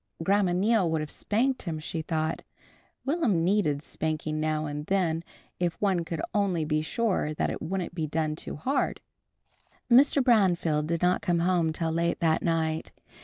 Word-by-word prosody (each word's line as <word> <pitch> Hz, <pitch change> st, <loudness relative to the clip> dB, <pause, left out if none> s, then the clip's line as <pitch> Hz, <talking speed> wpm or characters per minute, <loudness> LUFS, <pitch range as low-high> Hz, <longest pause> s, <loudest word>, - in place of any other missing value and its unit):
Grandma 195 Hz, +1 st, +2 dB
Neal 195 Hz, 0 st, +2 dB
would 160 Hz, -1 st, 0 dB
have 155 Hz, -, -4 dB
spanked 255 Hz, +5 st, 0 dB
him 165 Hz, -4 st, -4 dB
she 160 Hz, +1 st, -4 dB
thought. 155 Hz, 0 st, -2 dB, 0.6 s
Will'm 265 Hz, -, +1 dB
needed 165 Hz, -6 st, +1 dB
spanking 155 Hz, -1 st, -3 dB
now 155 Hz, 0 st, 0 dB
and 150 Hz, +1 st, -5 dB
then 170 Hz, -4 st, +1 dB, 0.4 s
if 175 Hz, -2 st, -1 dB
one 190 Hz, -4 st, +1 dB
could 165 Hz, -2 st, -4 dB
only 190 Hz, -6 st, +1 dB
be 155 Hz, 0 st, 0 dB
sure 180 Hz, -3 st, -1 dB
that -, -, 0 dB
it -, -, -6 dB
wouldn't 180 Hz, 0 st, -3 dB
be 160 Hz, -3 st, -2 dB
done 155 Hz, 0 st, -1 dB
too -, -, -7 dB
hard. 265 Hz, -, -1 dB, 0.9 s
Mr. 275 Hz, +2 st, +6 dB
Branfield 175 Hz, -, +3 dB
did 170 Hz, +1 st, -1 dB
not 180 Hz, +1 st, +3 dB
come 175 Hz, -1 st, +1 dB
home 170 Hz, -1 st, +2 dB
till 160 Hz, +1 st, -2 dB
late 170 Hz, +1 st, 0 dB
that 160 Hz, -1 st, +2 dB
night. 160 Hz, -1 st, -1 dB
170 Hz, 170 wpm, -27 LUFS, 155-195 Hz, 0.9 s, Mr